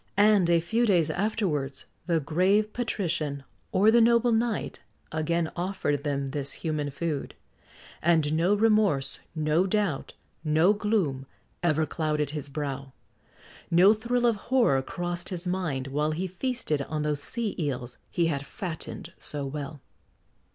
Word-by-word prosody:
And 205 -4 +5
a 170 -1 +5
few 225 +8 +1
days 175 -6 +3
afterwards, 175 -9 -1 0.2
the 170 -2 +2
grave 185 +8 +2
patrician, 170 - -2 0.3
or 210 +3 +5
the 235 +1 +6
noble 235 +1 +4
knight, 225 -1 -1 0.3
again 160 +1 0
offered 175 -6 -1
them 140 -2 -2
this 140 -1 0
human 155 -3 -2
food; 145 0 -3 0.7
and 160 -3 +3
no 175 +6 +3
remorse, 205 -11 +2 0.2
no 155 +4 +2
doubt, 195 -7 -1 0.3
no 160 +5 +4
gloom, 195 -11 0 0.3
ever 160 -2 +2
clouded 150 -3 -1
his 150 -2 -5
brow; 140 -2 -4 0.8
no 180 +5 +6
thrill 240 +3 0
of 230 -3 +3
horror 235 - +4
crossed 175 +4 -3
his 180 -1 -5
mind, 170 -8 -1
while 150 +3 0
he 175 +4 -2
feasted 190 - -2
on 150 +2 -3
those 150 -1 0
sea 230 +4 -3
eels 125 -5 -3
he 170 - +1
had 145 -4 -1
fattened 170 0 -6
so 145 -2 -4
well. 140 +1 -6
165 Hz, 140 wpm, -27 LUFS, 145-205 Hz, 0.8 s, the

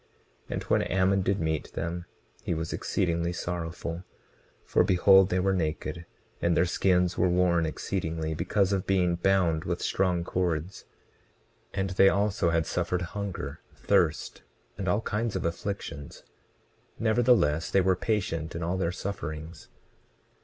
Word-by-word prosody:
20:29 - - -3
And - - -3
when - - +2
Ammon 95 +1 +2
did 95 +1 0
meet 80 -2 -2
them 85 +1 -4 0.4
he 85 - -2
was 80 0 -3
exceedingly 85 -2 -1
sorrowful, 85 0 -4 0.6
for - - +3
behold 95 0 +5
they 90 - +1
were 95 +1 +2
naked, 85 0 -3 0.3
and 85 0 +2
their 90 - +4
skins 90 0 +1
were 90 - +3
worn 85 -2 +2
exceedingly 80 -2 -3
because 95 +4 +1
of 95 -2 -1
being 90 -3 +2
bound 85 -3 +2
with - - -2
strong 90 -3 0
cords. 90 0 -2 0.9
And 95 -1 -2
they 95 +1 +6
also 100 -4 +1
had 80 -1 +1
suffered 90 +4 -1
hunger, 100 -3 -5
thirst, - - +1 0.3
and 95 - -5
all 100 +5 +2
kinds 110 0 -2
of 95 - -2
afflictions; 85 -4 -5 0.7
nevertheless 110 -9 +3
they 100 - +3
were 95 0 +3
patient 90 -6 -2
in 85 - -3
all 90 +3 -1
their 85 -2 0
sufferings. 80 -4 -6
90 Hz, 145 wpm, -28 LUFS, 85-95 Hz, 0.9 s, they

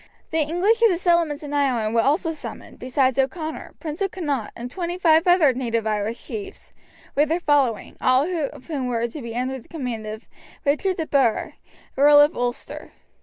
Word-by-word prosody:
The 320 - +1
English 355 +9 +2
of 460 - +7
the 355 - +1
settlements 340 -4 +1
in 290 0 -6
Ireland 250 -7 +1
were 230 - +4
also 305 +6 +1
summoned, 310 - -9
besides 260 0 +1
O'Connor, 310 +4 -3
Prince 315 +2 -6
of 390 - +1
Connaught, 290 - -3
and 240 +1 -7
twenty 350 -1 -3
five 330 -1 +4
other 345 -7 +5
native 230 -3 -2
Irish 215 +1 -2
chiefs, 400 -2 -8 0.4
with 295 +1 +2
their 330 +2 +1
following, 285 -8 +1
all 255 +1 +4 0.2
of 255 - -13
whom 280 -6 -3
were 235 -1 0
to 255 +5 -8
be 235 -1 -7
under 260 +2 -2
the - - -19
command 245 -9 -5
of 215 +1 -7 0.4
Richard 325 +6 +1
de 320 - -2
Burgh, 265 -7 +1 0.4
Earl 290 +1 +7
of 295 +3 +5
Ulster. 245 +2 -4
285 Hz, 185 wpm, -23 LUFS, 245-330 Hz, 0.4 s, of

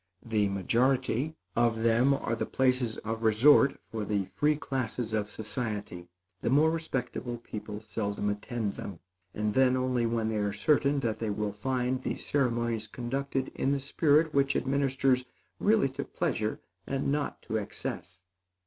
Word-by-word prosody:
The 105 -3 +1
majority 125 - +1 0.2
of 115 -1 +2
them 115 +4 +4
are 115 - -2
the - - -3
places 130 -3 +1
of 110 +1 -3
resort 120 +6 +5
for 110 -2 -5
the 100 -1 0
free 150 +9 +1
classes 125 -5 -3
of 105 -1 0
society. 105 -5 -5 0.3
The - - 0
more 150 +5 +5
respectable 130 -6 -3
people 105 -2 -7
seldom 105 -1 -3
attend 105 +1 -2
them, 95 - -7 0.4
and 105 0 0
then 130 +1 +4
only 125 -2 +1
when 115 -1 0
they 110 - -1
are 105 -1 0
certain 140 +5 +2
that 110 -4 -1
they 110 - -2
will 105 0 -2
find 125 +3 -1
the - - -2
ceremonies 120 -5 0
conducted 135 +2 -2
in 135 - 0
the 140 - 0
spirit 150 +3 +3
which 140 0 +2
administers 135 -1 +2 0.4
really 210 -8 +3
to 135 +2 -4
pleasure 115 -11 -2 0.3
and 135 0 -1
not 145 0 -2
to 110 - -2
excess. 90 -3 -6
120 Hz, 155 wpm, -29 LUFS, 110-135 Hz, 0.4 s, resort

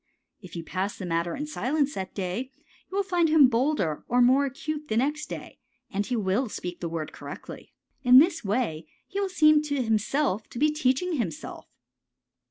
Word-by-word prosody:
If 185 -3 -11
you 165 - -5
pass 190 +4 -3
the 190 - -6
matter 170 0 -1
in 295 - -4
silence 295 0 -1
that 190 -1 -6
day 200 +7 -3 0.4
you 385 - -4
will 400 - +2
find 350 -4 +1
him 305 -4 +7
bolder 240 - 0
or 245 - +2
more 260 +3 +5
acute 300 +2 -5
the 220 - -1
next 295 +5 0
day, - - -8 0.3
and 200 +1 0
he 250 - -1
will 215 +3 0
speak 180 -3 -6
the 170 - -3
word 160 -2 -4
correctly. - - -9 0.3
In 250 -1 +7
this 325 0 +5
way 195 -7 -1 0.2
he 395 +1 -3
will 395 - -1
seem 305 -4 +5
to 285 -3 -1
himself 220 0 0
to - - -10
be 300 +4 +3
teaching 300 +4 0
himself. 175 - -5
255 Hz, 185 wpm, -26 LUFS, 195-300 Hz, 0.4 s, him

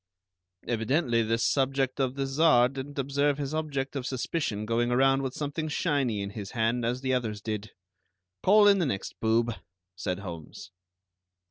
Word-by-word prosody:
"Evidently 120 +2 +1
this 115 +1 0
subject 135 -1 +1
of 130 -1 0
the 135 -1 -1
Czar 135 -3 +4
didn't 140 +2 -7
observe 140 +1 +1
his 145 0 -3
object 145 -3 -2
of 135 -2 -3
suspicion 125 -5 -2
going 115 +2 +1
around 135 +2 +3
with 130 -2 -4
something 150 +2 -3
shiny 140 - 0
in 100 - -5
his 100 -2 -6
hand, 115 +1 0
as 120 +2 -1
the 130 -1 0
others 115 -5 -1
did. 105 0 -4 0.7
Call 205 +1 +6
in 200 -1 +6
the 170 - +1
next 95 -7 -4
boob," 115 +1 +2 0.4
said 90 -1 -3
Holmes. 90 -1 -9
130 Hz, 160 wpm, -28 LUFS, 115-140 Hz, 0.7 s, Call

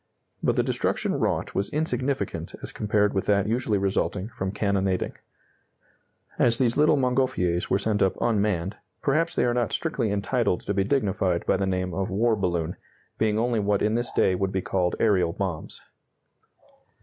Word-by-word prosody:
But - - +1
the - - +2
destruction - - 0
wrought - - -1
was 100 - -1
insignificant 140 -3 -2
as - - -5
compared 105 -1 +1
with 95 - -1
that 100 -1 +3
usually 115 -2 0
resulting 100 +1 -1
from 95 -5 -4
cannonading. 100 -2 0 1.3
As 115 -1 +4
these 120 -3 +2
little 150 0 +4
Montgolfiers 125 -10 +1
were 95 - +3
sent 105 +1 0
up 95 - +1
unmanned, 105 -4 0 0.3
perhaps 160 +4 +1
they - - +2
are 120 - +2
not 120 -1 0
strictly 130 -10 -1
entitled 100 -1 0
to 100 - -2
be 95 0 +1
dignified 95 -7 0
by - - +2
the 95 0 0
name 90 -1 -1
of 95 +2 -2
war 110 +4 +2
balloon, 85 -4 -1 0.4
being 110 -1 +2
only 115 0 +1
what 100 -1 +1
in 105 - +2
this 120 +1 0
day 95 - +2
would 95 +1 -1
be 95 -2 -2
called 90 -2 0
aerial 95 -6 +2
bombs. 90 -5 -4
100 Hz, 170 wpm, -25 LUFS, 95-120 Hz, 1.3 s, As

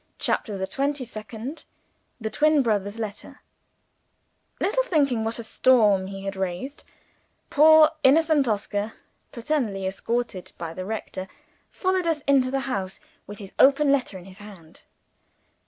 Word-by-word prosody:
CHAPTER 210 -3 -1
THE 190 - -2
TWENTY 275 +4 -2
SECOND 220 +6 -8 0.6
The 220 -1 -4
Twin 300 +2 +3
Brother's 205 -2 -1
Letter 215 -2 -7 1.2
LITTLE 460 +6 +1
thinking 280 - +1
what 225 +1 -2
a 235 - -5
storm 215 -5 +3
he 195 0 -8
had 195 0 -4
raised, 190 +9 -4 0.7
poor 315 +1 +7
innocent 300 0 +4
Oscar 205 0 -2 0.4
paternally 235 -7 -2
escorted 195 -1 -3
by 165 -1 -6
the 185 +2 -6
rector 195 -3 -5 0.4
followed 370 -2 -1
us 320 -3 0
into 275 -3 +3
the 270 +1 -1
house, 195 -8 -4 0.3
with 205 +1 -9
his 195 -1 -10
open 280 +1 +5
letter 255 -8 0
in 180 - -12
his 190 -1 -13
hand. 195 -6 -14
225 Hz, 140 wpm, -24 LUFS, 195-280 Hz, 1.2 s, poor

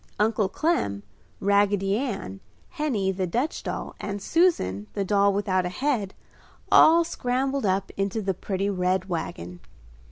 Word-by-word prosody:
Uncle 210 -2 +2
Clem, 100 - -1 0.4
Raggedy 200 0 +2
Ann, 200 - -4 0.3
Henny, 265 - -1
the 190 -1 -2
Dutch 245 - -2
doll - - -5
and 205 0 -4
Susan, 195 - +1
the 200 - -1
doll 200 0 +3
without 195 -2 0
a 180 - -2
head, 220 -2 -1 0.6
all 335 +2 +7
scrambled 265 -4 -1
up 190 +1 0
into 195 +2 -1
the 195 -2 -1
pretty 190 +2 -3
red 185 -1 0
wagon. 90 - -5
200 Hz, 135 wpm, -25 LUFS, 185-245 Hz, 0.6 s, all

